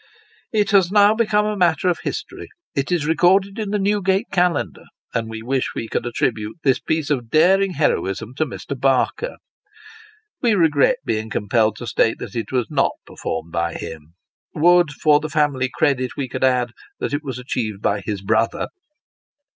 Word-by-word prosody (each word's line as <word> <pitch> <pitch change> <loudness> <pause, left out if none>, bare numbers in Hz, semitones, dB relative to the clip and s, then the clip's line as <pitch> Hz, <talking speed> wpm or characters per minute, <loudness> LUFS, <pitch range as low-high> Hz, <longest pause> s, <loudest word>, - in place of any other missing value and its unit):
It 210 -2 +1
has 190 -3 +4
now 205 0 +6
become 210 -2 +1
matter 180 +1 +2
of 175 - +1
history; - - -6 0.2
it 140 +4 -2
is 170 -4 +1
recorded 190 +6 +3
in 215 -2 -3
the 210 - 0
New 205 +1 +1
gate 195 +4 +1
Calendar; 180 -1 0 0.3
and 115 -1 -2
we 110 0 -7
wish 130 +2 -1
we 115 - -4
could 120 - -2
attribute 110 -2 -2
this 135 -2 +3
piece 155 -1 -2
of 120 -5 -1
daring 185 +6 +4
heroism 120 - -1
to 155 - +1
Mr. 140 +2 -6
Barker. 135 - 0 1.1
We 235 -4 +3
regret 165 - +3
being 110 0 -2
compelled 110 +1 +1
to 120 - -8
state 115 -1 +1
that - - -8
it 115 -3 -4
was 125 -3 +1
not - - +2
performed 80 +1 -5
by 85 0 -1
him. 80 +1 -8 0.4
Would, 175 +1 +5
for 150 0 +3
the 155 0 -5
family 145 -4 +1
credit 130 -2 0
we 135 - -2
could 130 - -4
add, 125 -2 +2 0.3
that - - -3
it 145 - 0
was 130 -4 -5
achieved 115 -5 -4
by 100 0 +1
his 100 -1 -4
brother 110 +3 0
140 Hz, 175 wpm, -21 LUFS, 115-180 Hz, 1.1 s, now